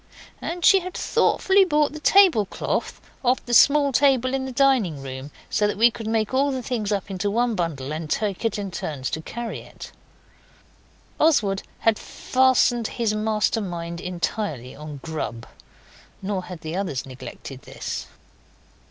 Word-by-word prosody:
And 345 0 -3
she 390 - +7
had 365 0 -7
thoughtfully 390 0 +3
brought 300 -5 +2
the 305 - -7
tablecloth 310 - +3 0.2
off 255 +1 +1
the 240 - -4
small 280 +3 +6
table 260 -1 +3
in 265 0 -1
the - - -5
dining 240 - +2
room, 130 +1 -7 0.2
so 210 - +1
that 205 - -2
we 235 +2 +6
could 225 -1 -7
make 220 +1 0
all 275 +2 +3
the 260 -2 -3
things 220 -4 -2
up 200 -1 -2
into 195 +2 -1
one 235 +3 +1
bundle 155 -7 -3
and 155 0 -5
take 205 +4 -1
it 225 -2 0
in 200 -2 -4
turns 140 -6 -4
to 160 - -3
carry 235 +7 -5
it. - - -11 1.3
Oswald 210 -11 +3 0.2
had 225 -2 +3
fastened 255 -3 +2
his 230 -3 +1
master 215 +1 0
mind 170 -3 -5
entirely 175 - -3
on 150 -1 -9
grub. 150 -8 -4 0.7
Nor 195 -1 -3
had 180 -3 -9
the 160 +2 -5
others 185 -10 -2
neglected 130 0 -9
this. - - -6
215 Hz, 160 wpm, -24 LUFS, 170-255 Hz, 1.3 s, she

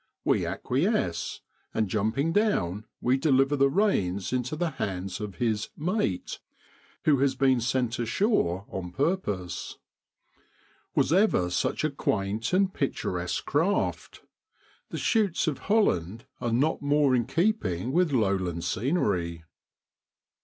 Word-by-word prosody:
We - - +2
acquiesce, 125 - -1 0.3
and 110 -1 +1
jumping 110 - 0
down 110 - +1 0.2
we 125 +2 +3
deliver 135 -1 +3
the 140 -1 +4
reins 100 - +1
into 125 +3 -1
the 170 +1 -1
hands 95 -7 -4
of 105 -3 -5
his 110 -3 -1
' - - -42 0.2
mate,' 95 - -2 0.7
who 150 -3 +5
has 135 -1 +2
been 130 -2 +3
sent 125 -1 0
ashore 115 - +1
on 90 -2 -6
purpose. 105 - -2 1.2
Was 155 - +3
ever 180 - +3
such - - 0
a 155 - +1
quaint 105 -4 -1
and 190 +1 +2
picturesque 90 -10 -2
craft? 165 +8 -1 0.7
The - - -5
schuits 205 -7 +1
of 150 -4 -1
Holland 115 - +1
are 120 - -2
not 135 +7 +1
more 145 -1 +3
in 120 -2 0
keeping 135 - 0
with 175 +1 +2
lowland 95 -8 0
scenery. 95 - -1
125 Hz, 125 wpm, -27 LUFS, 95-155 Hz, 1.2 s, who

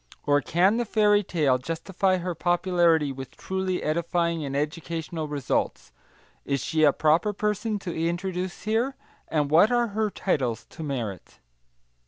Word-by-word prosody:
Or 145 0 +3
can 180 - +2
the 240 - +1
Fairy 210 -2 +3
Tale 150 -9 +1
justify 185 +6 -1
her 180 0 -3
popularity 170 -3 +2
with 135 -1 -9
truly 190 -1 -2
edifying 170 +1 0
and 140 -1 -4
educational 160 +1 -3
results? 145 -3 -2 0.5
Is 140 -1 -1
she 155 -1 +1
a 145 - +7
proper 160 +9 +2
person 210 +1 -1
to 180 -4 -5
introduce 175 +2 -2
here, 230 +5 0 0.3
and 150 -2 0
what 175 +9 +6
are 240 -1 +2
her 215 +1 0
titles 130 - -1
to - - -10
merit? 120 - -5
170 Hz, 145 wpm, -26 LUFS, 150-195 Hz, 0.5 s, a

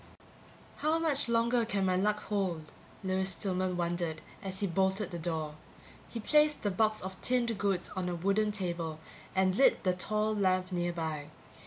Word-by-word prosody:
How 310 +2 +2
much 300 -6 +1
longer 235 +1 +3
can 205 -4 0
my 185 -1 +2
luck 210 +3 +1
hold? 180 -7 -2 0.3
Lewis 190 0 +1
Stillman 185 -1 -1
wondered, 170 -2 -1 0.2
as 190 0 -3
he - - +2
bolted 190 +2 +1
the 170 - -4
door. 160 -2 -2 0.6
He 235 - -5
placed 300 +5 +3
the 205 - +1
box 215 +2 +1
of 190 0 -7
tinned 240 -2 +1
goods 195 -3 0
on 185 -1 -1
a 175 - -2
wooden 200 +5 +1
table 170 -6 -3 0.4
and 190 0 +3
lit 265 +8 +4
the 185 -2 +3
tall 215 +4 0
lamp 185 -2 +1
nearby. 165 -4 -2
190 Hz, 165 wpm, -31 LUFS, 175-215 Hz, 0.6 s, lit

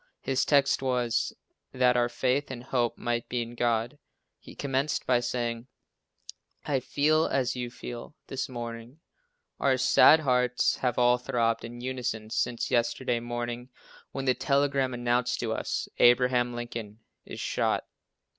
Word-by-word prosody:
His 135 0 +1
text 140 -2 +3
was 125 -3 0 0.4
"That 125 -1 +3
our 120 0 +2
faith 130 +3 0
and 125 -2 -7
hope 120 -3 -1
might 120 0 -2
be 120 -1 -1
in 115 +1 -10
God." 120 +3 -1 0.4
He - - -13
commenced 140 +1 -1
by 125 -1 +3
saying, 120 -1 -3 1.0
"I 140 -3 +1
feel 155 +4 +2
as 130 -2 0
you 125 -1 -4
feel 120 +3 -8
this 135 0 -4
morning: 120 +2 -7 0.6
our 135 -2 +2
sad 155 +4 +6
hearts 125 -3 +2
have 125 -2 -1
all 125 0 +4
throbbed 115 -3 0
in 120 +1 -8
unison 125 -4 -4
since 120 0 -1
yesterday 120 +1 +1
morning 120 +1 -5 0.4
when 135 -1 -4
the 130 - +4
telegram 140 -1 +1
announced 120 +1 0
to 115 -2 -1
us - - -3
Abraham 120 0 +4
Lincoln 115 -2 -6 0.3
is - - -8
shot." - - 0
125 Hz, 145 wpm, -28 LUFS, 120-130 Hz, 1.0 s, sad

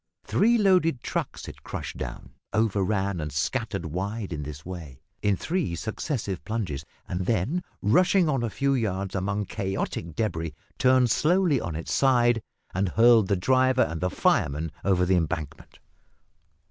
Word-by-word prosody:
Three 235 +3 +3
loaded 180 - +3
trucks - - -3
it - - -10
crushed - - -6
down, - - -7 0.2
over 110 -1 +2
ran, 95 -2 0
and 75 0 -4
scattered 75 +2 -2
wide 95 +4 -3
in 75 - -4
this 75 0 -8
way, 85 -8 -8 0.2
in 100 -1 +2
three 165 - -1
successive 110 - -3
plunges, 95 -11 -3 0.2
and 90 +1 -3
then, 120 - +1 0.2
rushing 175 - +4
on 135 -5 +1
a 120 - -1
few 140 +6 0
yards 100 -6 -1
among 100 +2 -1
chaotic 95 -5 -3
debris, 85 -7 -2 0.2
turned 130 -2 +4
slowly 165 - +3
on 85 - -4
its 80 - -4
side, 120 -4 +3 0.3
and 95 +1 0
hurled 115 0 +5
the 100 - +2
driver 130 +6 +3
and 80 0 -4
fireman 75 +3 +1
over 90 -2 +3
the 95 - +2
embankment. 80 -3 -4
100 Hz, 150 wpm, -26 LUFS, 85-130 Hz, 0.3 s, hurled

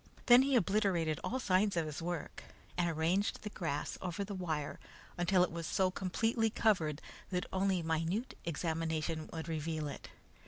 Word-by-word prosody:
Then 245 +1 +9
he 270 0 +2
obliterated 195 -7 +2
all 260 - -1
signs 195 -3 +2
of 165 - +2
his 155 +1 -5
work, 170 -2 -4 0.3
and 175 -1 +1
arranged 170 +5 0
the 210 - -5
grass 160 -7 -3
over 180 +1 -2
the 200 +1 -5
wire 160 -6 -3 0.4
until 180 +1 +3
it 180 - 0
was 165 -1 -4
so 185 -1 +2
completely 225 +5 +1
covered 170 -9 +1 0.3
that 180 -1 -1
only 190 -2 +1
minute 165 +9 -1
examination 160 -1 -2
would 160 0 -5
reveal 155 -1 -2
it. 145 - -7
175 Hz, 160 wpm, -34 LUFS, 160-195 Hz, 0.4 s, Then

